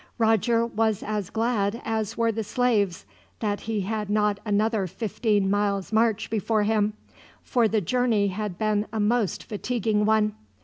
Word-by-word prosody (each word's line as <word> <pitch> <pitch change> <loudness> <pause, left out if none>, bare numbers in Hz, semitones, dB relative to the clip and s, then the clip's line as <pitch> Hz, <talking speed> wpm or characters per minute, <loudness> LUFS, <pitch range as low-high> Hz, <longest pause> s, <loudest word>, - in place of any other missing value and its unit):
Roger 230 +1 +3
was 220 -2 0
as 210 -3 -3
glad 225 -2 0
as 220 -1 -2
were 230 -1 +2
the 225 0 -3
slaves 205 -5 0 0.3
that 205 -2 -1
he 220 -2 -2
had 210 +1 -3
not 210 -1 +1
another 210 -1 +1
fifteen 210 0 0
miles' 200 0 0
march 225 -1 +2
before 220 0 +1
him, 210 0 +1 0.5
for 240 -3 +2
the 215 0 +1
journey 220 0 +1
had 200 -1 -4
been 215 -1 0
a 220 - -3
most 215 -1 +1
fatiguing 215 -1 -1
one. 215 0 +2
215 Hz, 150 wpm, -25 LUFS, 205-225 Hz, 0.5 s, Roger